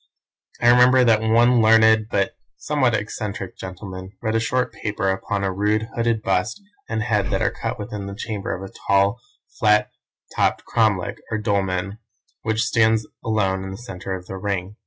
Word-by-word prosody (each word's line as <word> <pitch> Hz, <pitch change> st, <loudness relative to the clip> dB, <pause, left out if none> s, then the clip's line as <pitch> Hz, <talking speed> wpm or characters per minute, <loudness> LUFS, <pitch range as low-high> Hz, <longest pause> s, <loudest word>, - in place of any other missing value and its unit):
I 120 Hz, -, +4 dB
remember 125 Hz, +1 st, +6 dB
that 115 Hz, -3 st, +4 dB
one 115 Hz, +2 st, +4 dB
learned 110 Hz, 0 st, +5 dB
but 100 Hz, -4 st, 0 dB, 0.2 s
somewhat 130 Hz, -6 st, +1 dB
eccentric 105 Hz, -2 st, -4 dB
gentleman 95 Hz, 0 st, -8 dB
read 110 Hz, -2 st, -2 dB
a 115 Hz, -, +2 dB
short 125 Hz, +1 st, -1 dB
paper 100 Hz, -3 st, -1 dB
upon 100 Hz, +1 st, -2 dB
a 95 Hz, -, 0 dB
rude, 105 Hz, +3 st, 0 dB
hooded 115 Hz, -2 st, 0 dB
bust 95 Hz, -, 0 dB, 0.3 s
and 110 Hz, -1 st, -1 dB
head 105 Hz, -5 st, 0 dB
that -, -, 0 dB
are -, -, +2 dB
cut -, -, -4 dB
within 105 Hz, -1 st, -6 dB
the 100 Hz, -, -6 dB
chamber 105 Hz, -2 st, -4 dB
of 95 Hz, -, -4 dB
a -, -, -17 dB
tall, 100 Hz, +4 st, +3 dB, 0.4 s
flat 105 Hz, -1 st, +3 dB, 0.4 s
topped -, -, +1 dB
cromlech, 105 Hz, -6 st, +1 dB
or 110 Hz, -, -1 dB
dolmen, 100 Hz, -1 st, -1 dB, 0.4 s
which 110 Hz, +1 st, 0 dB
stands 110 Hz, -3 st, +2 dB, 0.2 s
alone 95 Hz, -4 st, 0 dB
in 95 Hz, -, -6 dB
the 95 Hz, -, -7 dB
centre 95 Hz, -5 st, -6 dB
of 90 Hz, -1 st, -9 dB
the 95 Hz, -, -7 dB
ring. 100 Hz, 0 st, -3 dB
105 Hz, 175 wpm, -22 LUFS, 95-115 Hz, 0.4 s, remember